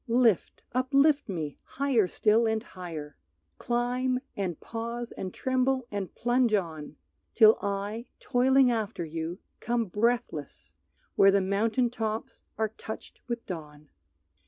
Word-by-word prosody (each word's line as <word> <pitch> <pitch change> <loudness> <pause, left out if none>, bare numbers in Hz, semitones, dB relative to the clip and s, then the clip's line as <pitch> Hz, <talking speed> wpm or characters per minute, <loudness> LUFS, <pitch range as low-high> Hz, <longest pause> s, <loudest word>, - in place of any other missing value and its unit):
Lift, 230 -4 +2
uplift 275 +2 +3
me, 155 -6 -4
higher 260 -8 +1
still 220 +4 +3
and 220 0 0
higher! 165 -8 -8 0.4
Climb 250 +1 0 0.2
and 185 -5 -3
pause 235 +1 -5
and 185 - -5
tremble 260 +1 0
and 200 -3 -4
plunge 240 -2 +2
on, 160 -6 -3 0.4
Till 220 0 +8
I, 200 +4 -3
toiling 260 +1 +4
after 215 -6 -2
you, 165 +2 -4 0.2
come 235 0 0
breathless 205 - -2 0.4
Where 195 - +7
the 200 0 +4
mountain 220 +6 +1
tops 220 -2 -4 0.2
are 220 -1 +1
touched 220 - -8
with 235 -1 -4
dawn! 150 -4 -8
220 Hz, 125 wpm, -28 LUFS, 185-245 Hz, 0.4 s, Till